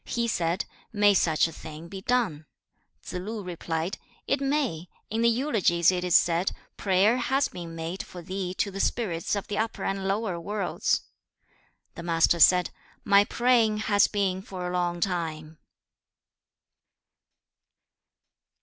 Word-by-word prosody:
He 235 -1 -1
said, 175 -4 0 0.3
'May 205 -1 +4
such 160 -4 +3
a - - -8
thing 160 0 -10
be 190 +2 -8
done?' 205 -11 0 0.6
Tsze 180 - -5
lu 215 +1 -5
replied, 170 0 -3 0.3
'It 275 - 0
may. 270 - -1 0.2
In 225 +1 0
the 235 - +5
Eulogies 215 - +2
it 180 -1 -2
is 180 -1 +2
said, 175 +2 +3 0.2
"Prayer 200 +4 +3
has 265 +3 +1
been 170 -2 -8
made 165 +3 -4
for 175 -1 -10
thee 185 0 -4
to 200 - -1
the 195 - -6
spirits 195 -6 -1
of 200 - -3
the 205 - -2
upper 220 +1 -2
and 195 0 -2
lower 195 -3 -1
worlds."' 200 +2 -1 0.9
The - - -8
Master 170 0 +2
said, 180 +2 +5 0.3
'My 200 -1 +6
praying 235 -3 +2
has 205 0 +5
been 190 -2 -1
for 185 -2 -6
a 180 - -4
long 175 -1 -1
time.' 160 -4 -3
190 Hz, 145 wpm, -27 LUFS, 170-215 Hz, 0.9 s, My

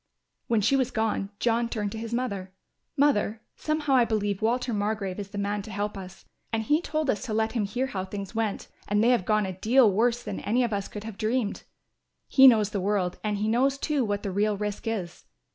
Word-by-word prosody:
When 230 -2 +2
she 230 +7 +3
was 260 -2 +1
gone 220 -4 -1
John 235 +1 +1
turned 210 -4 -2
to 220 - -6
his 230 0 -6
mother, 200 -7 -3 0.4
"Mother, 225 -6 +2
somehow 305 -2 -1
I 255 -2 +6
believe 205 -3 -1
Walter 240 +2 0
Margrove 205 -2 -2
is 200 - -5
the 205 - -8
man 205 +1 -1
to 210 - -10
help 205 +1 -3
us, 190 -1 -10 0.3
and 225 -1 0
he 300 +8 +2
told 310 -3 -2
us 205 - -3
to 215 - -3
let 220 0 +1
him 225 -4 0
hear 245 +6 -1
how 195 -8 -4
things 195 +1 -6
went 220 -2 -2 0.2
and 205 +1 +2
they 235 - +4
have 240 -7 +2
gone 215 0 +2
a 190 - -4
deal 225 +4 +4
worse 235 +4 +1
than 205 -2 -5
any 240 +4 +1
of 235 -3 -1
us 200 -1 -2
could 210 - -8
have 220 -2 -8
dreamed. 220 -1 -1 0.7
He 270 -1 +7
knows 215 -4 +5
the 200 - -2
world 190 -2 0
and 210 -1 -1
he 210 +1 -1
knows, 260 +5 +2
too, 290 -1 0
what 205 -2 -2
the 200 - -2
real 205 +2 +1
risk 210 +2 -4
is. 190 -6 -4
215 Hz, 230 wpm, -27 LUFS, 205-240 Hz, 0.7 s, He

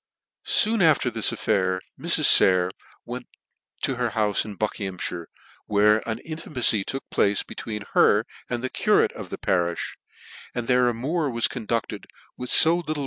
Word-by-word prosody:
Soon 220 0 +2
after 155 -7 +3
this 110 -2 0
affair 95 -3 0 0.2
Mrs. - - +3
Sayer 90 -1 +6 0.3
went 125 +1 -7 0.6
to 135 - -1
her 120 -1 0
houfe 105 -2 +1
in 105 -3 -9
Buckinghammire, 95 -5 -4 0.4
where 105 +1 +3
an 110 - -2
intimacy 130 -9 +1
took 135 +6 -6
place 100 0 +1
between 105 -2 -7
her 105 +2 +4 0.2
and 120 0 -3
the 130 - -2
curate - - +2
of - - -9
the - - -6
pa - - -3
rifli, 85 -2 -1 0.6
and 120 -1 -3
their 125 0 +3
amour 140 +7 -2
was 115 -2 +1
conducted 115 -1 -4 0.3
with 125 0 -7
fo 165 +2 +5
little 160 -3 -3
VOL. - - -4
115 Hz, 160 wpm, -24 LUFS, 100-130 Hz, 0.6 s, Sayer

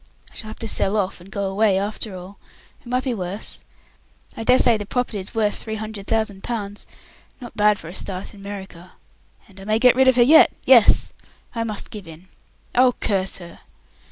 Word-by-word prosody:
I - - -22
shall 215 - -6
have 215 - -8
to 225 - -5
sell 210 0 +1
off 190 -3 -2
and 180 - -14
go 200 - -3
away 195 0 +2
after 205 0 -4
all. 185 +2 -11 0.4
It - - -18
might 250 +1 -1
be 260 - -1
worse. 190 0 -5 0.7
I - - -5
dare 250 +2 +5
say 240 -3 +4
the 210 -1 -4
property's 225 -5 -3
worth 210 -2 +1
three 220 -1 -5
hundred 215 -2 -7
thousand 220 -3 -1
pounds. 205 -4 -4 0.5
Not 240 -3 -10
bad 210 0 +3
for 165 - -11
a 170 - -8
start 190 +1 -4
in 205 - -14
America. 195 -3 -9 0.5
And 195 -2 -17
I - - -10
may 215 +2 +1
get 250 +1 +5
rid 265 0 +4
of 260 - +5
her 245 - +6
yet. 315 +6 +7
Yes. 250 -4 +6 0.4
I 230 -1 -2
must 215 0 -5
give 210 -6 -9
in. 165 +3 -13 0.4
Oh, 250 0 +4
curse 195 -2 0
her! 175 -2 -12
210 Hz, 205 wpm, -22 LUFS, 195-230 Hz, 0.7 s, yet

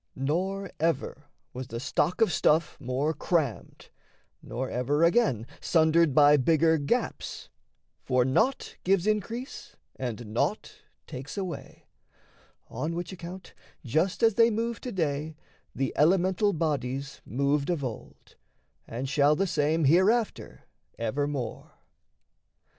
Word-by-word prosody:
Nor 185 +8 -2
ever 145 -2 -1 0.3
was 130 0 -6
the 115 0 -5
stock 150 - 0
of 215 -7 +4
stuff 155 +3 +2
more 135 +4 -1
crammed, 155 -5 -2 0.5
Nor 130 +3 -4
ever, 140 +6 0
again, 170 - +3
sundered 160 -3 +3
by 150 0 +7
bigger 160 +3 +3
gaps: 140 - -2 0.5
For 125 -1 +1
naught 220 - 0
gives 190 -1 +2
increase 225 - -3 0.2
and 120 -2 -5
naught - - -2 0.2
takes 135 +8 -8
away; 185 -3 -6 0.8
On 165 +2 -4
which 175 +2 -4
account, 180 +1 -9 0.3
just 160 - 0
as 225 -1 +5
they 230 +2 +5
move 230 +1 -2
to 250 - -5
day, 155 -4 -2 0.4
The 135 -1 -1
elemental 185 +5 +3
bodies 140 -5 -2
moved 140 +3 0
of 170 -5 -1
old 120 -4 -8 0.5
And 125 +4 -4
shall 145 +2 +3
the 195 - +1
same 160 -2 +1
hereafter 195 - +2 0.3
evermore. 135 +2 -3
155 Hz, 120 wpm, -28 LUFS, 135-185 Hz, 0.8 s, by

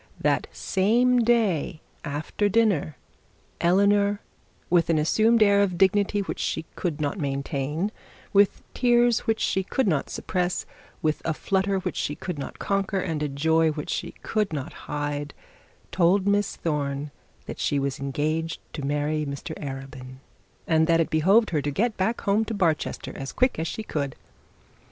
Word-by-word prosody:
That - - +1
same 240 +6 +2
day, 215 -10 +1 0.2
after 155 +7 -1
dinner, 200 - +2 0.6
Eleanor, 200 +3 +3 0.5
with 170 -1 +3
an 165 - +3
assumed 220 +9 +4
air 200 -1 +5
of 185 -3 0
dignity 200 +2 +3
which 195 - -5
she - - -2
could 165 -4 -2
no 145 -1 0
maintain, 140 +3 -2 0.4
with 200 -1 +4
tears 240 -1 +3
that 225 -1 +1
she 190 - +1
could 215 +6 -1
not 155 -7 0
suppress, 180 -1 -2 0.4
with 155 -1 0
a 160 - -1
flutter 195 +2 0
which - - -4
she 145 - -1
could 175 -1 -5
not - - -6
conquer, 195 0 -1
and 165 -4 -2
a 150 - -1
joy 160 +3 +2
which 150 -1 -4
she 175 -3 -3
could 215 -4 0
not 150 +1 -4 0.2
hide, 145 0 -3 0.6
told 185 +2 +3
Miss 205 0 +1
Thorne 145 -2 -2 0.3
that - - -7
she 145 - +1
was 140 +1 -2
engaged 155 +4 -2
to 150 - -5
marry 150 +2 0
Mr 140 -1 -5
Arabin, 135 -2 -7 0.5
and 160 -1 +3
that 165 -1 +4
it 165 - +1
behoved 195 +9 +4
her 155 -3 +1
to 145 - -2
get 215 - 0
back 210 +5 -1
home 205 +2 +2
to 225 - -4
Barchester 170 -6 -1
as 135 0 -5
quick 255 -8 +1
as 165 - -1
she 220 - -4
could. 140 -9 -3
170 Hz, 160 wpm, -25 LUFS, 145-200 Hz, 0.6 s, air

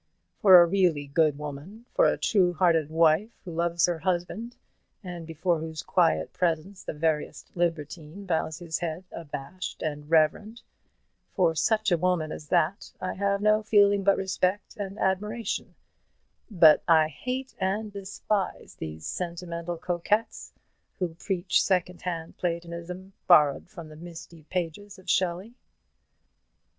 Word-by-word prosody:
For 190 -3 +9
a 175 - +7
really 170 -5 +1
good 150 0 +2
woman, 150 +10 -8
for - - +4
a - - +1
true 185 -5 +2
hearted 165 -3 +3
wife 160 +5 +3 0.2
who 175 - -6
loves 170 0 +1
her 175 -2 -2
husband, 185 +7 -2 0.5
and 175 -3 -7
before 165 +1 0
whose 160 -1 -6
quiet 80 0 +1
presence 180 +2 -1
the - - -4
veriest 155 -1 -2
libertine 165 +1 -3
bows 160 -3 -1
his 165 -2 -4
head 170 +1 -4
abashed 170 +3 -7
and 150 -1 -4
reverent, 165 +8 +2 0.7
for 175 -5 +3
such 215 +5 +1
a 175 - +3
woman 175 -3 0
as 150 - -8
that 165 +6 0
I 185 - -3
have 200 +1 0
no 215 +1 +4
feeling 205 -2 +4
but 200 0 +4
respect 190 +1 -1
and 200 0 -6
admiration; 210 +3 -2 0.7
but 165 -7 +6
I 160 -2 +5
hate 255 - -5
and 205 +3 -1
despise 200 0 -3
these 80 0 -7
sentimental 170 -1 -4
coquettes, 180 +6 -1 0.5
who 180 -2 -1
preach 180 +1 0
secondhand 180 -3 -2
platonism, 175 +2 -5
borrowed 150 -2 +5
from 170 -7 -10
the 155 - -12
misty 165 -1 -11
pages 185 +3 -4
of 185 0 -17
Shelley." 185 +5 0
175 Hz, 135 wpm, -27 LUFS, 160-195 Hz, 0.7 s, For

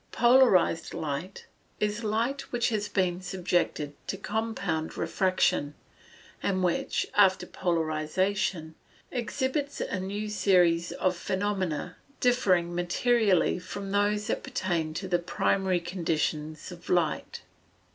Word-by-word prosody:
_ - - -37
Polarized 240 -9 +4
light 160 +3 -4 0.3
is 210 +2 -1
light 230 +6 -1
which 240 0 +1
has 210 -2 -1
been 180 -2 0
subjected 175 -5 -1
to 195 - -3
compound 200 -7 -2
refraction, 185 -6 +1 0.7
and 185 -2 0
which, 175 -1 0
after 195 -2 +4
polarization, 165 +1 -1 0.4
exhibits 265 +4 -2
a 185 - -2
new 200 +3 -3
series 180 -5 +3
of 185 -1 0
phenomena, 190 -3 -2 0.2
differing 185 -9 +2
materially 190 +2 +2
from 195 +2 -6
those 205 +1 +1
that - - -1
pertain 175 -11 -2
to 190 - -4
the 175 -1 +2
primary 185 +1 +1
conditions 160 -2 -2
of 175 -1 -11
light. 175 -4 0
185 Hz, 115 wpm, -28 LUFS, 170-210 Hz, 0.7 s, Polarized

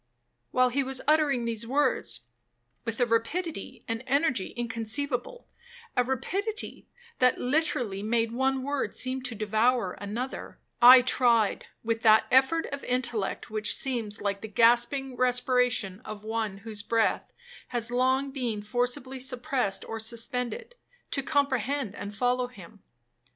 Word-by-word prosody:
While 255 0 +3
he 275 +3 0
was 265 -1 -2
uttering 295 -5 +3
these 230 0 -1
words, 255 - 0 0.6
with 230 0 -3
a 245 - +4
rapidity 235 - -2
and 230 0 -3
energy 265 - +1
inconceivable, 245 - -2 0.5
(a 250 - +4
rapidity 385 - -3 0.3
that 250 0 +4
literally 250 -7 0
made 225 +1 0
one 265 +2 0
word 285 0 -2
seem 260 +1 -1
to 250 -2 -5
devour 220 0 +1
another), 230 +6 -5 0.2
I 250 +1 +10
tried, 240 -4 +2 0.2
with 225 0 -1
that 220 -1 +6
effort 265 +6 +4
of 280 - -5
intellect 240 -7 -1
which 215 -1 +1
seems 230 -5 -3
like 200 -1 -2
the 220 - -6
gasping 240 +4 +2
respiration 250 -5 +1
of 215 -1 -8
one 220 -2 -2
whose 215 -2 -6
breath 225 +1 0 0.4
has 240 -1 -1
long 260 +2 +1
been 240 -6 -3
forcibly 250 +4 -2
suppressed 255 -4 -1
or 225 - -5
suspended, 250 - -3 0.4
to 275 - 0
comprehend 275 -4 0
and 205 0 -7
follow 250 +1 +1
him. 205 -4 -14
245 Hz, 135 wpm, -28 LUFS, 225-265 Hz, 0.6 s, I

